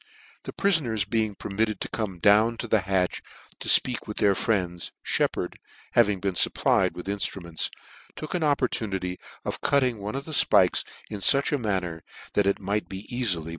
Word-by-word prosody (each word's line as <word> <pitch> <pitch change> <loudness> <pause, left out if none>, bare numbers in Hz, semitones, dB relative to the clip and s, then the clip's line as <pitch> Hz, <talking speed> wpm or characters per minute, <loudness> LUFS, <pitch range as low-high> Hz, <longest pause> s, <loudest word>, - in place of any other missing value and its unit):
The - - -5
priibners 125 - +1
being 110 -1 0
per - - -7
mitted 110 0 0
to - - -2
come 105 -5 -4
down 105 +5 +4
to 120 - -4
the 110 -2 +3
harch 95 -2 0 0.4
to - - +6
(peak 125 -2 -5
with 105 - -6
their 100 -1 +4
friends, 90 -5 -1
Sheppard, - - -1 0.3
having 105 -5 +3
been 95 0 -1
fupplied - - +2
with 90 - -7
inftruments, 95 -4 -3 0.5
took 155 - -6
an 180 - -1
opportunity 110 -10 -1 0.3
of - - -4
cutting 130 -5 +2
one 105 +4 -5
of 140 +1 -4
thefpikes 155 -2 +3 0.3
in 105 - -4
fuch 135 +8 +4
a 145 - +1
manner 95 -7 -2 0.3
that 100 -1 +2
it 100 - +1
might 100 -1 -2
be 95 0 -7
cafily 100 -10 -1
105 Hz, 170 wpm, -26 LUFS, 95-120 Hz, 0.5 s, to